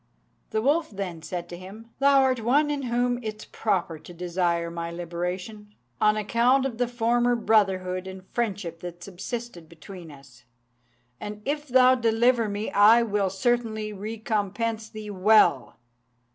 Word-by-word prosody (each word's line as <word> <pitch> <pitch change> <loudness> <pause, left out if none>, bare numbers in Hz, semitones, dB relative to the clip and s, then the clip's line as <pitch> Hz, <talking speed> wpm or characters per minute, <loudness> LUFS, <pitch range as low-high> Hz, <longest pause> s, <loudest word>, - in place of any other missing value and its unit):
The 220 - -1
wolf 310 +5 +2
then 190 -5 -6
said 175 +1 -5
to 175 - -7
him, 210 +6 -12
"Thou 275 0 +5
art 255 -3 +1
one 290 +6 +3
in 290 -1 -2
whom 245 -1 0
it 215 -2 -5
is - - -12
proper 180 -7 -2
to 175 - -12
desire 170 -1 -1
my 170 0 -4
liberation, 180 +5 -5 0.3
on 210 0 +4
account 235 +5 +2
of 245 -3 -4
the 245 - +2
former 240 +1 +1
brotherhood 190 -5 +1
and 190 0 -9
friendship 195 -8 -2
that 175 0 -8
subsisted 195 -2 -7
between 170 +1 -11
us; 135 -3 -16 0.8
and 210 0 -7
if 295 +1 -2
thou 255 0 +6
deliver 235 -1 +2
me, 205 +2 -3
I 220 +4 +6
will 205 -3 0
certainly 220 +1 -1
recompense 220 +1 -3
thee 215 -1 -8
well." 190 - +3
215 Hz, 150 wpm, -26 LUFS, 185-235 Hz, 0.8 s, thou